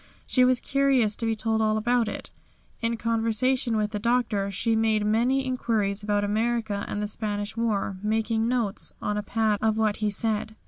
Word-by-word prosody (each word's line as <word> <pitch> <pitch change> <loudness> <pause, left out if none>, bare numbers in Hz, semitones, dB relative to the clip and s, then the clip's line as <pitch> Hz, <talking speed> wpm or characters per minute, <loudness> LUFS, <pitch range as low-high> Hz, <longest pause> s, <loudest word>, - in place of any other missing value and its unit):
She 255 - +3
was 250 0 +3
curious 270 -6 +2
to 230 - -2
be 225 - +1
told 220 0 0
all 215 0 +2
about 240 +1 +1
it. - - -5 0.5
In 230 0 0
conversation 230 +1 +1
with 210 -1 0
the 210 - -3
Doctor 220 -3 0
she 225 +4 0
made 220 -1 +1
many 245 +5 +2
inquiries 220 -6 -1
about 205 0 0
America 220 0 -1
and 210 - -3
the - - -1
Spanish 205 -1 -2
war, 210 -4 -1
making 220 +1 0
notes 235 -5 -1
on 210 - -2
a 210 - -1
pad 215 0 0
of 220 0 +1
what 215 -2 +1
he 215 -1 0
said. 215 +1 -2
220 Hz, 185 wpm, -26 LUFS, 210-235 Hz, 0.5 s, She